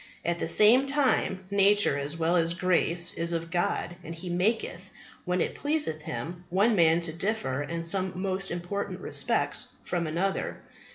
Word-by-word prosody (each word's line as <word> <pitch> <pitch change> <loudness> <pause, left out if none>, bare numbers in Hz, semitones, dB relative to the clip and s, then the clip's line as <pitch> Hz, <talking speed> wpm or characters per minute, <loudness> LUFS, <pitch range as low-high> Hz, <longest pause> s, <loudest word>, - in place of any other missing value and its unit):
At 170 0 0
the - - -2
same 240 +6 +5
time, 265 -9 +1
nature, 200 -4 +4
as 145 +3 -3
well 165 +2 +1
as 170 0 +2
grace, 175 -1 +1
is 170 +1 -1
of 165 0 -3
God, 175 0 -1
and 165 +1 -7
He 175 +2 -6
maketh, 200 +6 -1 0.4
when 180 -1 0
it - - -1
pleaseth 290 - -1
Him, 160 +8 -6
one 205 +6 +3
man 165 -2 +4
to 165 -2 -2
differ 165 -7 -2
in 165 +3 -4
some 185 +1 0
most 195 0 -1
important 175 +4 -4
respects - - 0 0.2
from 170 -2 -2
another. 180 +5 -2
175 Hz, 165 wpm, -28 LUFS, 165-195 Hz, 0.4 s, same